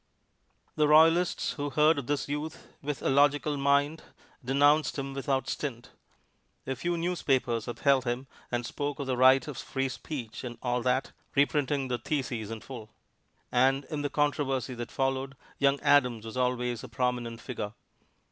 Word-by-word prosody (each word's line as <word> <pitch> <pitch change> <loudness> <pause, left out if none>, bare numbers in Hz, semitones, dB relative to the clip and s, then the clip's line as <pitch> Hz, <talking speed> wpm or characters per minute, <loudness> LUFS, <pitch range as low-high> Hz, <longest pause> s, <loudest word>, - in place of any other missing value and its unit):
The 150 -1 +4
royalists 165 +3 +4
who 145 0 -2
heard 150 +2 +4
of 135 - -7
this 145 -1 -1
youth 150 +3 -5
with 145 -1 -4
a - - +1
logical 145 +2 +3
mind 140 +3 +2 0.4
denounced 145 +5 +3
him 135 0 -4
without 135 -1 -1
stint. 120 -6 -4 0.7
A 135 - -2
few 170 +7 -2
newspapers 135 -9 0
upheld 135 +2 +2
him 120 +2 -2 0.3
and 120 -1 -1
spoke 145 +3 -3
of 140 - -4
the 130 -1 -1
right 130 +4 +5
of 145 -4 -6
free 135 0 -2
speech 130 -5 -6
and 120 -2 -6
all 125 -1 0
that, 130 +2 0 0.2
reprinting 140 -1 +2
the 125 -1 -2
thesis 125 -5 -3
in 115 -1 -6
full. 115 -4 -9 0.6
And 135 +2 +3
in 150 -2 -2
the 145 - -1
controversy 135 -4 0
that 120 -1 -6
followed, 135 0 -1 0.2
young 140 0 +3
Adams 125 -6 +3
was 110 - -7
always 125 -2 -1
a - - -8
prominent 120 -2 -2
figure. 110 -3 -5
135 Hz, 160 wpm, -29 LUFS, 125-145 Hz, 0.7 s, right